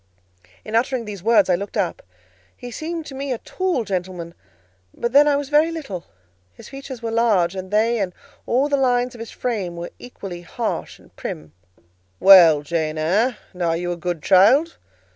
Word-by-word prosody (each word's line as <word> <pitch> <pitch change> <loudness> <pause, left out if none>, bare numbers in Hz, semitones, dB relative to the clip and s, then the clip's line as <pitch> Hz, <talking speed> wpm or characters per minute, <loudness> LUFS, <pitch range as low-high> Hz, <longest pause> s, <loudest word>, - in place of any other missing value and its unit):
In 215 - -8
uttering 245 0 0
these 205 -3 -7
words 215 0 +4
I 185 - +3
looked 200 +5 -3
up: 185 -5 -1 0.6
he 245 - -9
seemed 325 +5 -5
to 275 - -9
me 275 0 -4
a 250 - -1
tall 365 -1 -2
gentleman; 180 -4 -4 0.6
but 235 - -2
then 285 +3 +6
I 290 - +3
was 280 -1 -3
very 305 +2 +3
little; 245 - -6 0.5
his - - -13
features 270 -3 -9
were 225 - -2
large, 215 -7 +2
and 185 0 -6
they 220 +3 +2
and 190 -3 -1 0.4
all 260 +4 +2
the 285 -1 +1
lines 250 -2 +1
of 240 - -12
his 230 - -7
frame 205 -9 -3
were 170 0 -6
equally 195 -8 -8
harsh 220 +6 -4
and - - -23
prim. 75 0 -7 0.7
"Well, 170 -6 +8
Jane 155 0 -2
Eyre, 210 +10 +1 0.2
and 180 - -10
are 165 -1 +1
you 175 +1 -3
a - - -2
good 175 -2 -4
child?" 240 - +4
215 Hz, 185 wpm, -21 LUFS, 180-260 Hz, 0.7 s, Well